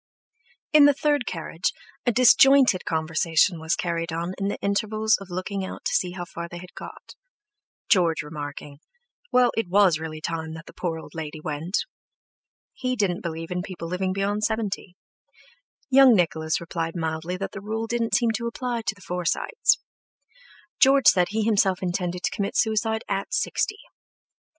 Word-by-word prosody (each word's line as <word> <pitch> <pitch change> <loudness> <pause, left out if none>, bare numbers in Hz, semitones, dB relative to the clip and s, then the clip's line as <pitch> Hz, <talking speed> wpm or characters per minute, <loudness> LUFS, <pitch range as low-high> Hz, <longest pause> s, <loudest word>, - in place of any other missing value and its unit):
In 300 -1 +8
the 290 -1 +5
third 290 -3 +1
carriage 165 0 -2 0.4
a - - +5
disjointed 255 -2 +6
conversation 160 +2 +1
was 160 +1 0
carried 170 -1 -2
on 170 +2 -3
in 195 - -1
the 200 - -2
intervals 215 +2 +1
of 195 - -10
looking 185 +2 -3
out 190 - -7
to - - 0
see 180 -2 0
how 175 -1 -5
far 170 0 -7
they 175 - -8
had 180 +1 -11
got, - - -11 0.7
George 165 -7 +3
remarking, 145 -1 -8 0.5
"Well, 250 -1 +4
it 225 -5 -1
was 185 -4 +4
really 155 -1 -6
time 160 0 -4
that 165 +1 -10
the - - -13
poor 170 -3 -3
old 160 - -11
lady 155 -1 -6
went." 155 +5 -2 0.9
He 255 0 -2
didn't 195 -6 0
believe 165 0 -5
in 180 0 -1
people 180 -2 -7
living 185 +2 -1
beyond 200 +2 -1
seventy, 210 -4 -2 1.0
Young 260 -2 +7
Nicholas 160 -3 0
replied 165 0 -4
mildly 160 +1 -3
that 195 - -4
the 195 - -8
rule 220 +2 -3
didn't 230 0 0
seem 235 -2 +2
to 235 +1 -3
apply 240 0 -3
to 215 - 0
the 200 - -19
Forsytes. 180 - +1 1.0
George 275 0 +6
said 180 -2 +3
he 220 +1 -1
himself 195 -4 +2
intended 180 0 -2
to - - 0
commit 200 -1 -2
suicide 220 0 +1
at 195 0 -2
sixty. 420 - -1
185 Hz, 165 wpm, -25 LUFS, 165-220 Hz, 1.0 s, In